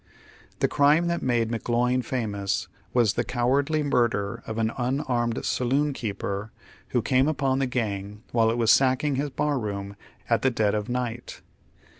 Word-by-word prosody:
The - - +4
crime 150 +4 +4
that 170 - -1
made 120 -3 +1
McGloin 120 +2 +1
famous 105 -6 -2 0.2
was 115 -5 +3
the - - 0
coward 130 +4 +1
ly 155 -1 +1
murder 115 -5 0
of 110 0 -4
an 110 0 +1
nnarmed 125 -2 -1
saloonkeeper 120 -6 -1 0.4
who 120 - 0
came 130 +3 +3
upon 135 -3 +1
the 135 - +1
gang 105 -4 -3
while 115 -1 +3
it 115 - 0
was 115 -2 +4
sacking 135 +1 +3
his 145 +2 -1
bar 145 +1 0
room 100 -2 -4 0.3
at 115 -2 +2
the 130 - +3
dead 110 -4 +1
of 105 +1 -2
night. 120 -1 -4
120 Hz, 160 wpm, -26 LUFS, 110-135 Hz, 0.4 s, The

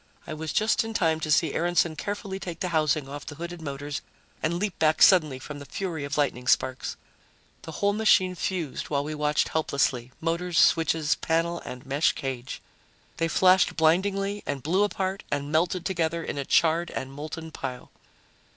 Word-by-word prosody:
I 155 - -6
was 155 0 -4
just 215 0 +2
in 225 0 -6
time 160 -6 +2
to 155 - -4
see 155 0 +3
Aaronson 170 -1 +1
carefully 200 +1 -4
take 175 -3 -6
the 180 - -1
housing 155 -3 +1
off 145 +1 -7
the 145 - -8
hooded 170 +2 -7
motors, 145 -1 -5 0.4
and 170 +2 0
leap 200 0 -3
back 155 0 +3
suddenly 155 -8 +6
from 145 +2 -8
the 140 - -9
fury 170 -2 -4
of 140 +1 -3
lightning 125 -4 0
sparks. 130 0 +1 0.6
The 160 - -9
whole 200 +5 +1
machine 205 -4 +4
fused 175 -5 -3
while 140 -1 0
we 155 +1 -4
watched 150 0 +1
helplessly 135 -5 0
motors, 170 +1 -1
switches, 160 -2 +4
panel 165 +1 0
and 125 +2 -8
mesh 140 +3 +2
cage. 130 -2 -5 0.5
They 165 - +1
flashed 185 +3 +4
blindingly 195 +5 +2
and 140 -2 -3
blew 175 +7 +2
apart 195 -1 -1
and 145 0 -2
melted 170 +2 +1
together 170 -3 -1
in 145 - -4
a 140 - -3
charred 165 +3 +3
and 135 0 -5
molten 155 +3 -7
pile. 130 -4 -6
160 Hz, 180 wpm, -26 LUFS, 145-180 Hz, 0.6 s, suddenly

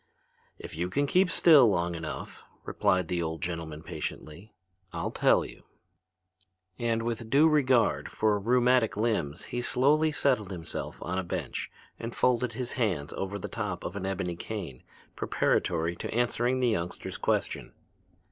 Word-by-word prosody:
"If - - -9
you 85 +2 -2
can 145 +10 +1
keep 180 +6 +3
still 150 -9 +7
long 85 -3 0
enough," 80 -1 -6 0.2
replied 90 -2 +1
the 85 0 -1
old 80 -1 -3
gentleman 80 -3 -4
patiently, 85 +6 -7 0.4
"I'll - - -3
tell - - +3
you." - - -11 1.2
And 115 -1 0
with 115 -1 -3
due 145 +6 +6
regard 130 -7 +2
for 105 -1 +1
rheumatic 125 +1 +3
limbs 95 -10 -1
he 120 - -4
slowly 150 +6 +3
settled 130 -9 +1
himself 85 -4 -6
on 95 +2 -2
a - - -2
bench 85 - -4 0.3
and 115 +1 -5
folded 125 -1 +2
his 125 +2 -4
hands 90 - -1
over 95 +1 -3
the - - -5
top 105 -5 -4
of - - -5
an 95 -1 -3
ebony 90 -2 -2
cane 85 - -6 0.3
preparatory 85 +2 0
to - - -5
answering 120 +2 +1
the 125 - +3
youngster's 85 -5 -3
question. - - -1
110 Hz, 150 wpm, -29 LUFS, 85-125 Hz, 1.2 s, still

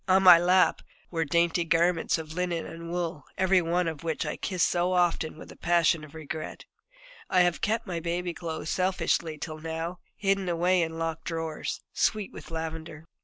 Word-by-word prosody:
On 190 0 +5
my 180 -2 +10
lap 180 +2 +4
there - - -20 0.2
were 165 -2 0
dainty 170 +3 +2
garments 165 +1 +2
of 160 -1 -7
linen 175 -1 -1
and 165 0 -8
wool, 170 -3 -3
every 190 0 +4
one 175 +1 0
of 160 -3 -4
which 165 -1 -2
I - - -2
kissed 185 -3 0
so 180 +1 +1
often 175 -3 +1
with - - -11
a - - -12
passion 170 -2 +2
of 155 0 -12
regret. 155 0 -6 0.6
I 185 - +4
have 175 -1 +2
kept 225 +2 0
my 175 -4 -3
baby 175 +1 -2
clothes 160 -2 -5
selfishly 180 -3 0
till 155 +1 -6
now, 165 +2 -4 0.2
hidden 195 -2 0
away 175 +2 +2
in 160 -1 -2
locked 165 -1 -3
drawers, 160 -2 -3
sweet 215 -3 0
with - - -10
lavender. 160 -1 -6
170 Hz, 185 wpm, -28 LUFS, 160-180 Hz, 0.6 s, my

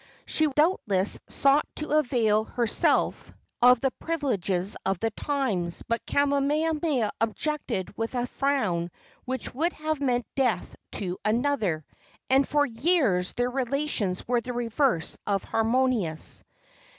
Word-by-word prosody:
She 310 - +1
doubtless 270 - +1
sought 280 +2 +3
to 305 - -4
avail 240 -8 +3
herself 235 -1 +1 0.3
of 250 0 +6
the 270 - +1
privileges 205 - -1
of 195 -1 0
the 225 +2 0
times, 215 -11 -2
but 230 0 -1
Kamehameha 285 -2 +1
objected 225 - -2
with 225 +3 -3
a 245 0 0
frown 230 -12 0 0.4
which 260 -1 -4
would 330 +7 0
have 310 -1 -3
meant 245 -3 +1
death 255 -4 0 0.2
to 185 -3 -4
another, 215 - 0 0.5
and 270 +1 +4
for 290 -1 +3
years 230 - +1
their 245 +1 0
relations 255 -7 -1
were 245 -1 +2
the 250 +2 -5
reverse 240 - 0
of 200 -2 0
harmonious. 225 - 0
245 Hz, 125 wpm, -27 LUFS, 210-285 Hz, 0.5 s, of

